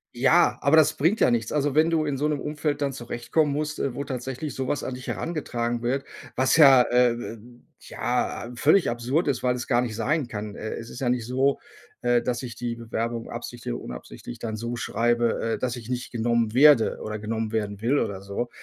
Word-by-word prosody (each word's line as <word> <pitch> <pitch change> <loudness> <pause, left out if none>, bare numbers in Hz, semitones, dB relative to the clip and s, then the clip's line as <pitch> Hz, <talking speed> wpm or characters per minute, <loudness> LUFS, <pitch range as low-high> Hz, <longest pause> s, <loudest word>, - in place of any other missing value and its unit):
Ja, 160 +8 +4
aber 140 +2 +4
das 155 -2 +5
bringt 170 +10 +1
ja - - +5
nichts. 115 -2 -1
Also, 145 -1 +1
wenn 155 +3 +4
du 165 -2 +1
in 145 -2 -1
so 150 +3 0
'nem 150 -3 -1
Umfeld 150 0 -2
dann 140 -1 0
zurechtkommen 120 +4 -1
musst, 155 +1 -3
äh, 130 -3 -2
wo 140 - -3
tatsächlich 130 +2 -5
sowas 135 +2 -2
an 130 - -4
dich 125 - -10
herangetragen 120 -7 -2
wird, 130 +3 -1 0.3
was 130 +4 +3
ja 135 -5 +8
äh, 125 0 +3
ähm, 120 0 -8 0.2
ja, - - -2
ähm, 120 0 -10
völlig 165 +9 +4
absurd 125 +8 0
ist, 130 -3 -1
weil 125 -1 +1
es 120 -1 -5
gar 120 -1 +3
nicht 120 -3 -3
sein 140 +5 0
kann. 105 -2 -6
Äh, 110 - -5
es 115 - -7
ist - - -9
ja 130 - -1
nicht 120 -2 0
so, 130 +3 +1 0.4
äh, 120 -1 +3
dass 120 +1 -2
ich 120 -3 -6
die 120 -1 -3
Bewerbung 115 0 -4
absichtlich 120 - -6
oder - - -6
unabsichtlich - - -9
dann 110 -2 -4
so 120 +2 -4
schreibe, 120 -1 0
äh, - - -1
dass 125 -1 -2
ich 115 -1 -10
nicht 125 0 -3
genommen 115 -1 0
werde 140 -2 +5
oder 105 0 -4
genommen 110 +1 -3
werden 105 -2 -2
will 120 +7 +1
oder 95 -7 -2
so. 100 +5 -4
120 Hz, 220 wpm, -25 LUFS, 115-140 Hz, 0.4 s, ja